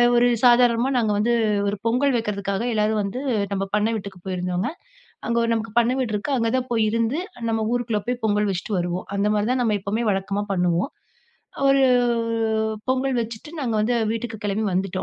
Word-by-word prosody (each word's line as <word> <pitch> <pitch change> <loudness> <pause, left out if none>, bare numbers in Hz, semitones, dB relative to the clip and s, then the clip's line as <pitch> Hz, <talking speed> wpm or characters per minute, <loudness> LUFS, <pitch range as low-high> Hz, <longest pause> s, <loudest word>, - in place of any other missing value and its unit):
ஒரு 240 +1 +5 0.2
சாதாரணமா 245 +1 +5
நாங்க 220 -3 +1
வந்து 235 +3 +2 0.3
ஒரு 205 0 -1
பொங்கல் 255 +3 +2
வைக்கிறதுக்காக 200 -1 -2
எல்லாரும் 215 0 +1
வந்து 225 +7 -4 0.3
நம்ம 195 0 -1
பண்ண 210 +1 +2
வீட்டுக்கு 195 -3 -9
போயிருந்தோங்க. 180 +2 -2 0.6
அங்க 235 0 +1
நமக்கு 225 -1 -3
பண்ண 240 +1 +2
வீடு 230 -4 -1
இருக்குது 265 +6 -1
அங்க 230 -1 +1
தா - - +1
போய் 225 -1 +2
இருந்து 230 +7 0 0.3
நம்ம 225 -1 0
ஊருக்குள்ள 235 -4 -1
போய் 250 -1 -2
பொங்கல் 210 -1 +1
வெச்சுட்டு 190 +2 -3
வருவோ. 175 +1 -2
அந்த 200 +1 +1
மாதிரி 210 +2 0
தா 255 - +1
நம்ம 215 -2 +2
எப்போவுமே 215 +4 -2
வழக்கமா 195 +1 -1
பண்ணுவோ. 175 0 +1 0.9
ஒரு 275 0 +5 1.0
பொங்கல் 260 0 +1
வெச்சுட்டு 230 +6 -8
நாங்க 230 -3 -1
வந்து 240 +3 +1 0.2
வீட்டுக்கு 225 -1 -4
கெளம்பி 210 +2 -1
வந்துட்டோ. 185 0 -1
220 Hz, 170 wpm, -23 LUFS, 200-240 Hz, 1.0 s, ஒரு